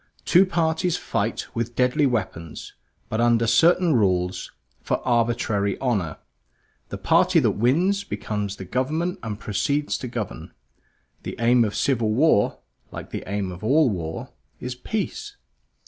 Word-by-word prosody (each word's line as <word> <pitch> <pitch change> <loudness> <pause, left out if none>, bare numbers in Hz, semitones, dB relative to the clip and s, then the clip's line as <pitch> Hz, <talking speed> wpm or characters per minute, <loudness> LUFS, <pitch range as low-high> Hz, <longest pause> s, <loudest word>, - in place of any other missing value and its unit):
Two 185 +2 +5
parties 170 0 0
fight - - -2
with 115 +1 -3
deadly 130 +4 +3
weapons, 85 -9 -4 0.3
but 110 - -1
under 120 -1 +3
certain 170 +6 +4
rules 95 -5 0 0.4
of - - +2
arbitrary 115 -4 +1
honor; 100 - -1 0.7
the - - -5
party - - +3
that - - +2
wins 175 - +2
becomes 105 - -4
the 95 - -8
government 155 - -1
and 110 -2 -5
proceeds 140 +8 -1
to 130 - -5
govern. 115 -5 -6 0.7
The - - -6
aim 120 +1 +4
of 105 -2 -2
civil 120 -5 +1
war, 125 -3 +3 0.3
like - - -9
the - - -4
aim 100 -2 -2
of 90 +2 -10
all 135 +3 +4
war, 80 -4 -5 0.3
is 125 0 -4
peace. 220 - -4
120 Hz, 140 wpm, -24 LUFS, 105-150 Hz, 0.7 s, Two